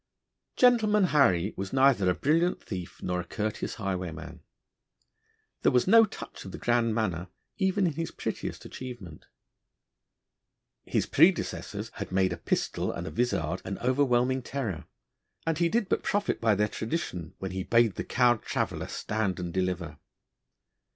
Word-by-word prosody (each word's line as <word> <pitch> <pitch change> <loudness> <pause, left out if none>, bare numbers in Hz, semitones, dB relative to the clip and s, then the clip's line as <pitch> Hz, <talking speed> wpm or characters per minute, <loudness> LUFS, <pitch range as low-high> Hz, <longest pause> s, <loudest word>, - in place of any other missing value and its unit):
'Gentleman 220 -5 +4
Harry' 110 - +3
was 95 0 -5
neither 130 -8 +4
a 90 - +2
brilliant 165 +5 +2
thief 90 -4 -7
nor 90 0 -1
a - - -2
courteous 105 +3 -3
highwayman. 85 -5 -5 1.2
There - - +4
was 125 -1 +3
no 225 +3 +7
touch 210 - -9
of 95 - -8
the - - -7
grand 120 -2 +1
manner 95 -6 -1 0.3
even 190 0 +2
in 165 - +1
his 165 +3 -3
prettiest - - -5
achievement. 120 -11 -9 1.6
His - - 0
predecessors - - +2
had - - -5
made 95 -1 +2
a - - -6
pistol 85 - -1
and 85 - -5
a - - -5
vizard 95 -8 -1
an 95 +1 -4
overwhelming 130 0 +2
terror, 120 - -4 0.6
and 165 -1 0
he 170 -1 +3
did 225 +1 +1
but - - 0
profit 205 -1 -1
by 110 -2 +3
their 105 +1 +2
tradition 110 - -4
when 95 -1 -5
he 95 0 -3
bade 115 +1 +3
the - - -4
cowed 120 -3 +3
traveller - - -2
stand 105 -4 -2
and 85 -1 -4
deliver. 90 -5 -2
110 Hz, 150 wpm, -28 LUFS, 90-140 Hz, 1.6 s, no